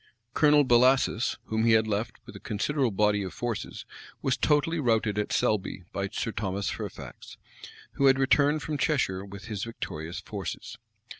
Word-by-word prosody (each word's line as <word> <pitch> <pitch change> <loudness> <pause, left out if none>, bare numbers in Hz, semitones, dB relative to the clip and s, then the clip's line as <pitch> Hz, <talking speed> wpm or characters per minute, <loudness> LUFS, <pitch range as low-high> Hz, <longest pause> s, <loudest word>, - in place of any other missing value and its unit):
Colonel 150 -1 +5
Bellasis, 125 -2 +3
whom 110 0 -1
he 115 0 +5
had 110 0 +4
left 110 +2 -2
with - - -12
a - - -8
considerable 130 +5 -1
body 105 0 +2
of 95 - -6
troops, 120 -3 -4 0.4
was 130 - +2
totally 155 +3 +1
routed 110 -5 +1
at 105 - -2
Selby 95 -3 0
by 100 0 -2
Sir 115 - -3
Thomas 100 -1 -2
Fairfax, - - -8 0.5
who 140 - +2
had 135 -1 +5
returned 145 +2 +3
from 150 0 -3
Cheshire 125 -11 0
with 100 0 -10
his 105 -4 -4
victorious 85 -8 -6
forces. - - -6
115 Hz, 160 wpm, -28 LUFS, 105-135 Hz, 0.5 s, Colonel